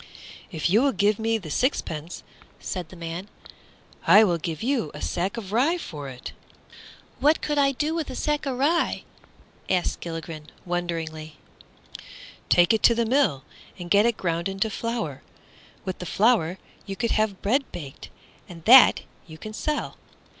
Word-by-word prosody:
"If 160 -2 -1
you 205 +7 +4
will 275 0 +2
give 205 +1 +2
me 225 0 +1
the 170 -8 -8
sixpence," 165 - -2 0.4
said 180 -4 -5
the - - -12
man, 170 +3 -6 0.8
"I 210 - +8
will 175 -5 +1
give 165 +3 -4
you 245 - 0
a - - -7
sack 185 +8 -2
of 200 -4 -6
rye 275 +11 +2
for 145 - -7
it." 125 -1 -8 0.9
"What 300 +2 +4
could 295 -1 -1
I 275 -1 +3
do 300 +4 -1
with 325 -2 -3
a - - -6
sack 295 +1 -1
of 260 -2 -2
rye?" 315 +6 +1 0.7
asked 180 -2 0
Gilligren, 165 -2 -7 0.2
wonderingly. 165 -3 -4 1.1
"Take 175 +4 +5
it 220 - +1
to 235 - +5
the 235 0 +1
mill, 220 - +2 0.3
and 175 -2 -8
get 205 +3 +5
it 235 - 0
ground 170 0 -1
into 195 +3 -1
flour. 225 - -3 0.6
With 185 - -4
the 180 - -6
flour 195 -2 +2 0.3
you 195 - -4
could 235 +3 -1
have 215 -3 0
bread 260 +7 +1
baked, 140 -5 -9 0.4
and 165 -2 -11
that 250 +2 +8 0.3
you 160 -1 -11
can 215 +6 -8
sell." 300 +7 -3
195 Hz, 165 wpm, -25 LUFS, 165-240 Hz, 1.1 s, I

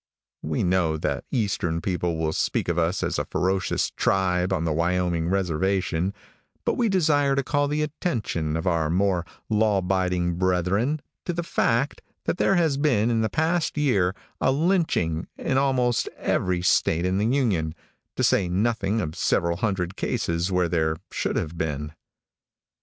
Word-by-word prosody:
We - - -1
know 90 -3 +2
that - - -2
eastern 95 -8 -1
people 90 -2 -1
will 80 -1 -1
speak - - 0
of 85 0 +1
us 85 +3 0
as - - -1
a - - -1
ferocious 95 +1 0
tribe 90 -1 +1
on 85 -3 0
the 80 - 0
Wyoming 85 0 0
reservation, 95 0 0 0.5
but - - +2
we 235 -3 +1
desire 150 -7 +3
to 140 - +1
call 145 +1 +1
the 150 +1 0
attention 110 - -2
of 80 - -4
our 85 -4 +1
more 90 0 +1 0.2
law 105 -1 +2
abiding 90 -2 0
brethren 95 - +1 0.2
to 175 - -1
the 170 +1 -2
fact 130 -4 0 0.2
that - - 0
there 195 - +3
has 160 -6 +2
been 120 -6 +2
in 115 -1 +2
the 110 - +1
past 160 0 0
year 100 -11 +2 0.2
a - - +3
lynching 145 - +1
in 130 - 0
almost 125 -3 +1
every 90 -1 0
state 85 -1 +2
in 95 +1 +1
the 105 - +1
Union, 105 - +1 0.4
to - - -1
say 95 -3 +3
nothing 105 +2 0
of 80 -4 -3
several 85 +1 +1
hundred 95 -4 -1
cases 85 +3 -1
where 90 -1 +2
there 80 -2 0
should - - -2
have 80 +2 -3
been. 75 -1 -2
95 Hz, 165 wpm, -25 LUFS, 85-125 Hz, 0.5 s, desire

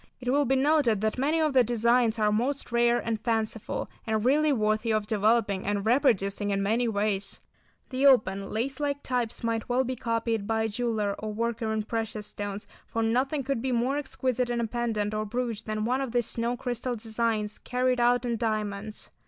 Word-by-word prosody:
It 250 -1 -1
will 285 +1 +3
be 270 - +2
noted 270 -6 +3
that 220 +3 -1
many 300 +5 +2
of 310 -3 +2
the 255 -2 +6
designs 235 0 +2
are 210 -1 +2
most 250 +5 -1
rare 235 0 +3
and 225 -3 -2
fanciful, 225 -2 -2 0.2
and 220 0 0
really 300 +4 +4
worthy 215 -2 +1
of 215 -1 +1
developing 210 -2 +1
and 205 0 -1
reproducing 220 -5 +2
in 195 0 0
many 230 +4 +1
ways. 205 -2 -1 0.5
The 265 +2 +3
open, 195 -7 +3
lace 260 +7 -2
like 285 -1 -2
types 245 -3 -2
might 230 0 -1
well 250 +2 +2
be 260 0 -3
copied 230 -3 -1
by 220 0 +1
a - - +1
jeweller 215 -3 -1
or 215 0 -4
worker 230 +1 -2
in 220 -1 -1
precious 220 -1 -3
stones, 205 0 -5 0.2
for 225 - -1
nothing 265 +6 +1
could 265 -3 -1
be 260 +1 -1
more 250 +4 +1
exquisite 255 -3 -1
in 240 0 -1
a 235 - +1
pendant 220 -2 -1
or 215 0 -1
brooch 230 0 -3
than 215 0 -2
one 255 +3 +1
of 260 -3 -4
these 240 -2 +2
snow 235 +2 -2
crystal 245 0 -3
designs 220 -1 -1
carried 250 0 0
out 245 +1 +3
in 235 -1 -1
diamonds. 215 -2 -3
230 Hz, 195 wpm, -27 LUFS, 215-250 Hz, 0.5 s, the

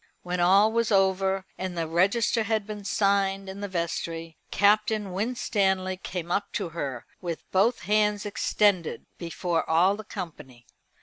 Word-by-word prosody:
When 180 0 -3
all 195 +5 +5
was 230 0 +1
over, 190 -1 +2
and 185 -2 -4
the 165 -1 -1
register 200 +8 +2
had 220 -1 0
been 210 -1 -7
signed 195 -1 +1
in 190 +1 -7
the 205 - -3
vestry, 165 -2 -3
Captain 210 -1 +2
Winstanley 190 -3 0
came 175 -2 -5
up 200 +2 -1
to - - -2
her, 140 -7 -5 0.2
with 170 -2 -4
both 210 +6 +2
hands 210 +2 +1
extended, 205 -3 +1
before 170 0 -1
all 175 +5 +4
the 215 - -8
company. 155 - -8
195 Hz, 145 wpm, -27 LUFS, 175-205 Hz, 0.2 s, all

